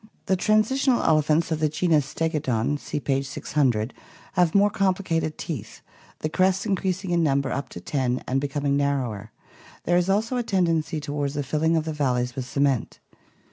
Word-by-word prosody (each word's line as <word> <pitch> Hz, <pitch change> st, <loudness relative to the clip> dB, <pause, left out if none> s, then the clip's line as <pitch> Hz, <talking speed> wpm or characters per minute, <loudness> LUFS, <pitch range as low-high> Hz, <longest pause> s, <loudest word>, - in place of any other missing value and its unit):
The 190 Hz, -, +2 dB
transitional 230 Hz, +7 st, +2 dB
elephants 155 Hz, +1 st, +2 dB
of 160 Hz, -, 0 dB
the 155 Hz, -1 st, +2 dB
genus 155 Hz, -2 st, +2 dB
Stegodon 145 Hz, -4 st, -1 dB
(see -, -, -4 dB
page 135 Hz, -1 st, -1 dB
600) 130 Hz, -5 st, 0 dB, 0.4 s
have 175 Hz, -1 st, +2 dB
more 205 Hz, +1 st, +5 dB
complicated 185 Hz, -5 st, 0 dB
teeth, 115 Hz, -10 st, -6 dB, 0.4 s
the -, -, 0 dB
crests 185 Hz, +4 st, +1 dB
increasing 190 Hz, -2 st, -1 dB
in 170 Hz, -1 st, +2 dB
number 140 Hz, -3 st, +1 dB
up 140 Hz, -2 st, -3 dB
to -, -, -8 dB
ten 130 Hz, +3 st, -1 dB
and 135 Hz, +1 st, 0 dB
becoming 140 Hz, 0 st, -1 dB
narrower; 130 Hz, -7 st, -1 dB, 0.5 s
there 175 Hz, +1 st, +2 dB
is 180 Hz, +1 st, +1 dB
also 220 Hz, +6 st, +1 dB
a -, -, +1 dB
tendency 170 Hz, -7 st, 0 dB
toward 145 Hz, -1 st, -3 dB
the 145 Hz, -1 st, -2 dB
filling 160 Hz, +4 st, +1 dB
of 155 Hz, -, -1 dB
the 160 Hz, -, -3 dB
valleys 125 Hz, -4 st, 0 dB
with 130 Hz, -, -4 dB
cement. 140 Hz, -2 st, 0 dB
155 Hz, 170 wpm, -25 LUFS, 140-180 Hz, 0.5 s, more